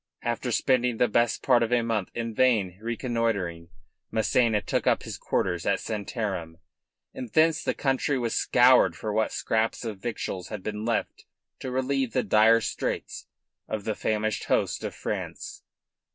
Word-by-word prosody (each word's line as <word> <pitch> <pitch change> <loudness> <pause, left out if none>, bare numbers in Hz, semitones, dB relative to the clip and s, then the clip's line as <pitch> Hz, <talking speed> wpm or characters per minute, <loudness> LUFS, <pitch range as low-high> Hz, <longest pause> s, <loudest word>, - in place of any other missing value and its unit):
After 120 +1 -2
spending 125 0 +2
best 120 0 +2
part 120 - +4
of 115 0 0
a 120 -1 +3
month 110 -5 -1
in 115 -1 -3
vain 105 -7 +2
reconnoitering, 115 -8 -2 0.4
Massena 110 0 +2
took - - -2
up - - +3
his - - -6
quarters 90 -2 -1
at 100 - +2
Santarem, 100 -6 -4 0.6
and 125 - -6
thence 160 0 +3
the - - -1
country 135 +1 0
was 120 -2 -1
scoured 125 0 +5
for 105 -1 -4
what 110 +1 +1
scraps 110 +2 -1
of 105 -4 -5
victuals 95 -5 -4
had 105 -2 -7
been 105 0 -4
left 115 -1 -2 0.3
to 130 - -5
relieve 130 -1 -1
the - - +1
dire 110 +2 +5
straits - - -4 0.4
of 110 -2 -4
the 110 - -1
famished 110 0 -1
host - - 0
of - - -4
France. - - -5
115 Hz, 155 wpm, -26 LUFS, 105-120 Hz, 0.6 s, scoured